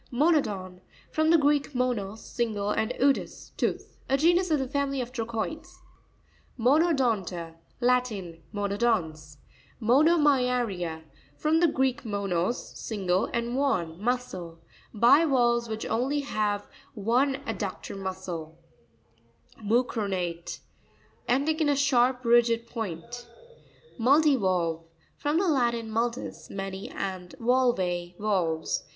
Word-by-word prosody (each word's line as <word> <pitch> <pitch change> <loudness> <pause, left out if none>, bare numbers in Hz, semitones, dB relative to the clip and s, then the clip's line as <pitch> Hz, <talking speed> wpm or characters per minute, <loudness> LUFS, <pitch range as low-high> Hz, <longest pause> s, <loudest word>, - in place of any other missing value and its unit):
Mo'nopon.—From 245 - -1
the 335 - +7
Greek, 290 -2 +1
monos, 225 -5 -2
single, 210 -4 -2
and 220 +2 0
odous, 275 +1 0
tooth. - - -3
A 270 - +3
genus 345 +4 +3
of 310 - +3
the 265 -2 -2
family 275 0 -1
of 245 -1 -4
Trochoides. 265 +9 -4 0.8
Monopon'ta.—Latin. 230 - 0
~ - - -33
Monodons. 200 -8 -1 0.4
Mono'mya'r1A.— 250 - +2 0.3
From 310 +1 +2
the 345 - +5
Greek, 265 -4 0
monos, 200 -1 -2
single, 190 -4 0
and 235 0 -2
mudén, 185 - 0
muscle. 205 -8 -3 0.3
Bivalves 240 -1 +4
which 220 0 -4
have - - -5
only 285 +3 0 0.7
one 245 +6 +2
ad - - -4
ductor - - -5
muscle. 185 -4 -6 1.1
Mu'cronare.—Ending 220 - -2
in 310 - +2
a_ 285 -1 +2
sharp, 255 -2 +2
rigid 235 -1 +4
point. 230 +2 -6 0.7
Mu'ttivaLtve. 215 - +3 0.2
— - - -36
From 295 +2 0
the 380 +2 +2
Latin, 235 -6 +1
multus, 235 +2 -3
many, 195 0 -5
and 185 -2 -5
valve, 245 +1 +3 0.4
valves. 180 -7 0
235 Hz, 105 wpm, -27 LUFS, 195-270 Hz, 1.1 s, the